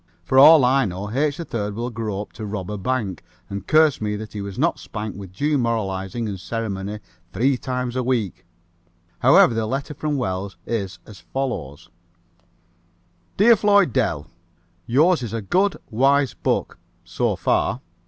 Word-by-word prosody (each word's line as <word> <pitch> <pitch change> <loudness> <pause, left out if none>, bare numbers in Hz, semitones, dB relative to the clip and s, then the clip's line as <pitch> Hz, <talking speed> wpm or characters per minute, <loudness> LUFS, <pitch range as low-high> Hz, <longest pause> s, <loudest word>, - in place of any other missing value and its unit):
For 130 +9 +3
all 150 -1 +9
I 135 +1 +3
know 100 +2 -5
H. 145 +4 0
3rd 105 -11 -4
will 120 +2 -3
grow 105 -3 -3
up - - -18
to 110 - -7
rob 100 -2 -5
a 105 - -3
bank 105 -4 -2 0.3
and 100 0 -6
curse 155 -4 +4
me 105 -1 -1
that 105 +1 -8
he 105 - -5
was 100 -1 -7
not - - +1
spanked 105 -1 -6
with 95 -2 -9
due 145 +9 0
moralizing 110 -2 -2
and 100 -3 -5
ceremony 105 -1 -4 0.3
three 135 +7 +2
times 125 -1 -3
a 130 - 0
week. 120 -9 -2 0.7
However, 120 - +6
the 110 -1 -1
letter 135 +4 -3
from 150 0 -2
Wells 95 -4 -3
is 100 -6 -3
as 105 -3 -13
follows: 85 - -5 1.5
"Dear 230 +4 +7
Floyd 205 -2 +3
Dell: 85 - 0 0.6
Yours 155 +7 +3
is 115 -3 -5
a 115 - -2
good, 190 - +1
wise 135 +3 +3
book - - -2 0.2
so - - -1
far. 125 - 0
115 Hz, 165 wpm, -22 LUFS, 100-135 Hz, 1.5 s, all